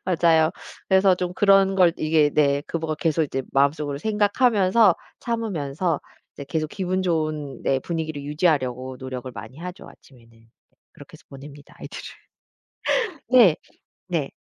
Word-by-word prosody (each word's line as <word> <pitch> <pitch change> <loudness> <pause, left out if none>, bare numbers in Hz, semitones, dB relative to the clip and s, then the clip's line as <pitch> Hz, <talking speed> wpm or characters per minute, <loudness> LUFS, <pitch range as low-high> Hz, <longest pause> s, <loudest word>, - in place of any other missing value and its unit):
맞아요. 165 -3 +3 0.4
그래서 190 0 +5
좀 180 0 -4
그런 195 -1 +4
걸 180 -3 +4
이게 155 -1 +2
네 140 -1 +2
그 165 - -3
뭐 160 -1 -3
계속 160 +1 0
이제 135 -2 -3
마음속으로 140 +1 +1
생각하면서 210 - +3 0.3
참으면서 175 - -2 0.3
이제 140 - -9
계속 155 -1 -2
기분 185 -1 -2
좋은 155 -5 -2
네 135 - +1
분위기를 155 -1 -4
유지하려고 140 -4 -1
노력을 130 -1 -6
많이 130 +4 -10
하죠 180 +3 -8
아침에는. 120 -4 -18
네 115 - -25 0.4
그렇게 - - -15
해서 - - -16
보냅니다 140 +1 -13
애들을. - - -9 1.1
네. 230 -11 +7 0.5
네. 165 -6 -2
160 Hz, 320 characters per minute, -23 LUFS, 140-185 Hz, 1.1 s, 네